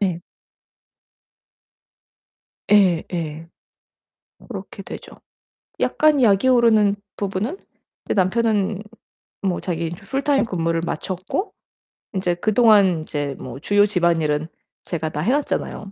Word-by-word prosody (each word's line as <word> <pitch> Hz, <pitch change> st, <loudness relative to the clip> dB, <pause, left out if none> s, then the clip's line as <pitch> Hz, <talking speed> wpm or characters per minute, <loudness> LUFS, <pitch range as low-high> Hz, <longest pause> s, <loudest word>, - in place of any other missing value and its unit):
네. 180 Hz, -4 st, 0 dB, 2.5 s
예 185 Hz, -5 st, +5 dB
예. 165 Hz, -1 st, -4 dB, 1.0 s
그렇게 -, -, -8 dB
되죠. -, -, -9 dB, 0.7 s
약간 305 Hz, -3 st, +3 dB
약이 205 Hz, +1 st, +4 dB
오르는 220 Hz, -5 st, +4 dB, 0.2 s
부분은 205 Hz, -, -3 dB, 0.5 s
이제 -, -, 0 dB
남편은 205 Hz, 0 st, +1 dB, 0.6 s
뭐 190 Hz, -3 st, -1 dB
자기 170 Hz, -2 st, -2 dB
인제 170 Hz, +1 st, -7 dB
풀타임 275 Hz, +4 st, +1 dB
근무를 165 Hz, -5 st, -1 dB
마쳤고 185 Hz, -, -3 dB, 0.6 s
인제 185 Hz, -3 st, 0 dB
그동안 205 Hz, -3 st, +4 dB
인제 145 Hz, -3 st, -3 dB
뭐 130 Hz, +1 st, -8 dB
주요 205 Hz, +6 st, +3 dB
집안일은 165 Hz, -6 st, +1 dB, 0.4 s
제가 160 Hz, -2 st, -3 dB
다 150 Hz, -1 st, -4 dB
해 205 Hz, +10 st, +1 dB
놨잖아요. 270 Hz, -7 st, -2 dB
190 Hz, 225 characters per minute, -22 LUFS, 165-215 Hz, 2.5 s, 예